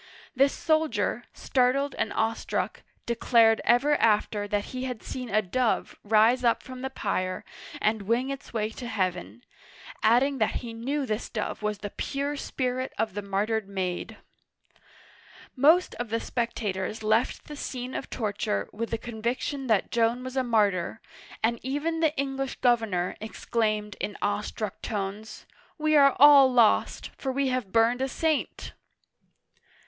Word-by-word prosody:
This 275 +2 +4
soldier, 315 -1 0
startled 270 +2 +1
and - - -2
awestruck, 225 0 -1 0.2
declared 230 -1 +4
ever 275 +5 +4
after 210 -1 +2
that 205 0 0
he 255 0 -3
had 250 -4 -5
seen 250 -2 -6
a 215 +1 +2
dove 235 +5 0
rise 225 +4 +4
up 235 -1 +2
from 255 -1 -9
the 265 - -3
pyre 185 -7 -2 0.3
and 215 0 +1
wing 235 +6 0
its 275 - -7
way 220 -1 -1
to 240 +2 -7
heaven, 185 +1 -3 0.6
adding 255 +5 +3
that 220 - +1
he 230 - -6
knew 270 +5 -2
this 215 -1 -3
dove 215 -1 -4
was 210 -1 -1
the 205 0 -6
pure 280 +1 -3
spirit 255 -2 -3
of 220 -2 -1
the 205 - -3
martyred 205 +1 -1
maid! 185 -2 -3 1.4
Most 315 +7 +4
of 240 -2 -5
the 230 +1 0
spectators 220 -4 -3
left 220 +3 +1
the 300 - -8
scene 255 -2 -5
of - - -5
torture 200 - -2
with 230 +2 -4
the 230 - -1
conviction 240 +4 -3
that 215 -5 +1
Joan 235 +2 +1
was 255 0 -6
a 260 - +2
martyr, 210 -4 +1 0.4
and 230 +1 +1
even 290 +5 -2
the 320 -2 +1
English 270 -1 -2
governor 225 -8 +1
exclaimed 215 -1 -2
in 205 - -4
awestruck 210 0 -3
tones: 205 0 -5 0.2
" - - -29
We 310 0 +2
are 275 -2 +6
all 280 -2 +8
lost, 235 -3 +3
for 265 - -2
we 270 0 0
have 255 -7 -2
burned 230 +3 +3
a 265 - +1
saint 310 +2 -2
235 Hz, 155 wpm, -27 LUFS, 215-265 Hz, 1.4 s, all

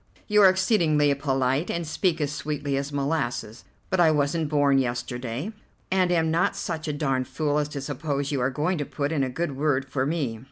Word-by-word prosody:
You 210 -1 +4
are 195 - +9
exceedingly 165 -7 +3
polite, 135 +1 0
and 170 0 -2
speak 165 +2 0
as 145 -1 -1
sweetly 145 -1 -3
as 140 +1 -2
molasses, 130 -6 -2 0.3
but 190 - +1
I 170 -2 +6
wasn't 150 +1 +1
born 145 -2 +3
yesterday, 120 - -3 0.4
and 185 -1 +2
am 165 -2 +2
not 170 +2 +2
such 160 0 -4
a 150 - -1
darned 135 -4 -1
fool 150 -1 0
as 150 0 -1
to 145 -2 -5
suppose 145 0 -3
you 140 -3 0
are 125 - +2
going 155 +6 -1
to 145 - -1
put 145 +1 -3
in 150 -4 +1
a 130 - -1
good 145 +2 -3
word 140 -1 +1
for 135 0 -1
me." 140 -8 -2
145 Hz, 205 wpm, -25 LUFS, 135-160 Hz, 0.4 s, are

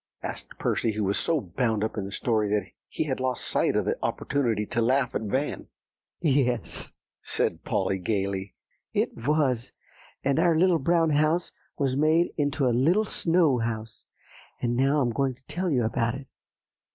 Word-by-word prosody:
asked - - -7
Percy, 110 - 0
who 105 0 -1
was 100 +1 +1
so 165 -2 +1
bound 110 +1 -1
up 110 - -2
in 100 - -3
the 100 - -7
story 105 -3 0
he - - -2
had 135 -4 -2
lost 130 -1 -1
sight - - +1
of - - +1
the - - -1
opportunity 115 -7 0
to 115 - -1
laugh 130 +2 +2
at - - -1
Van. 130 +7 -2 0.5
"Yes," 135 -6 0 0.3
said - - 0
Polly 95 - 0
gayly, 95 0 -2 0.4
"it - - 0
was, 130 -2 0 0.5
and 140 +3 +2
our 165 -1 +4
Little 175 -1 +4
Brown 165 +2 +2
House 155 +4 +2 0.3
was 135 -3 0
made 155 +4 +3
into 145 -1 0
a 125 - +3
little 170 - +3
snow 165 - +2
house; 110 -1 -4 0.5
and 120 0 0
now 135 +4 +3
I'm 120 -3 +1
going 135 +1 0
to 130 - -31
tell 180 +1 -2
you 130 -6 +2
about 115 +2 0
it. 135 0 -8
130 Hz, 170 wpm, -27 LUFS, 110-150 Hz, 0.5 s, our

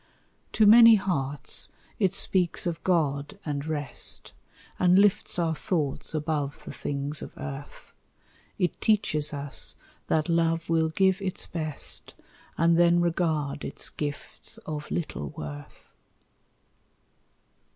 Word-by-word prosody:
To 220 - +4
many 230 +1 +9
hearts 145 -9 -1 0.3
it 190 -4 +3
speaks 185 -3 +1
of 170 -1 -3
God 150 -1 0
and 145 -1 -3
rest, 145 -4 -2 0.5
And 180 0 +5
lifts 205 -1 +3
our 165 -2 +1
thoughts 155 -2 -2
above 150 -2 -2
the - - -6
things 140 +1 -3
of - - -9
earth; 140 0 -8 0.6
It 180 - -1
teaches 195 -9 +2
us 140 -1 -2 0.3
that 155 0 +1
love 165 0 +1
will 160 -1 +3
give 190 +3 +2
its 190 -2 -3
best, 155 -3 -4 0.4
And 165 +1 +4
then 175 0 +5
regard 160 -5 0
its - - -3
gifts 145 -1 -6
of 150 -1 -5
little 115 - -3
worth. 75 -1 -9
160 Hz, 120 wpm, -27 LUFS, 145-180 Hz, 0.6 s, many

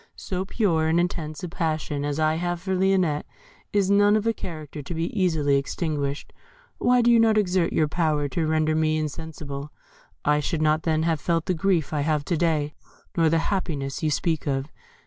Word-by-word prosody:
So 185 -1 -4
pure 175 -7 +1
and 165 +2 +3
intense 165 -2 -2
a - - -2
passion 155 -4 -2
as 145 +1 -2
I 155 0 +3
have 175 0 -2
for 190 +2 -3
Lionette 185 -5 +1 0.4
is 200 -1 +2
not 205 +1 +5
of 215 0 0
a 230 - +2
character 155 -7 -7
to 145 +5 -6
be 165 +1 -2
easily 160 -8 +2
extinguished. 145 0 -3 0.5
Why 245 0 +4
did 240 - +5
you 235 - +6
not 225 -1 +4
exert 185 -4 +2
your 155 - +2
power 155 -3 0
to 155 +4 -1
render 155 0 +2
me 155 0 +1
insensible? 150 -2 -5 0.5
I 150 0 +3
should 155 +1 -1
not 155 +1 +3
then 160 -1 +1
have 165 -3 0
felt 165 -2 0
the 185 - +1
grief 170 -3 0
I 150 - 0
have 150 -1 0
to 170 - 0
day, 155 -3 0 0.4
nor 165 -3 +3
the 165 - +3
happiness 145 -9 -2
you 155 - +1
speak 160 0 -1
of. 135 +1 -1
160 Hz, 195 wpm, -25 LUFS, 150-180 Hz, 0.5 s, you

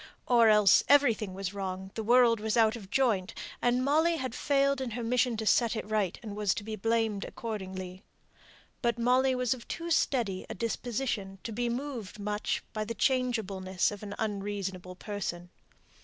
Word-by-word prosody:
Or 235 -2 +5
else 210 -2 +6
everything 235 -9 +3
was 195 0 -4
wrong, 190 -1 -5
the 225 - -4
world 235 0 +5
was 220 +2 -1
out 220 0 +4
of 200 -5 -10
joint, 220 -7 +1 0.3
and 245 +1 +2
Molly 320 +4 +3
had 260 -5 -4
failed 275 0 +1
in 260 - -2
her 240 - -3
mission 245 0 +1
to 220 - -3
set 235 +1 +3
it 220 - -4
right, 210 -4 0
and 210 -3 -6
was 210 -2 +1
to - - -5
be 215 +1 -5
blamed 225 -1 0
accordingly. 190 -4 -6 0.8
But 235 -2 +1
Molly 255 +2 +3
was 250 -1 +1
of 240 -2 -11
too 335 0 -5
steady 235 - +1
a - - -5
disposition 230 -4 -3
to 230 - -5
be 240 +2 -1
much 235 +1 -1 0.5
moved 210 0 -2
by 215 - -2
the 230 +2 -5
changeableness 205 -8 0
of 205 - -8
an 205 -1 -6
unreasonable 195 -3 -4
person. 180 -3 -5
220 Hz, 175 wpm, -30 LUFS, 200-245 Hz, 0.8 s, else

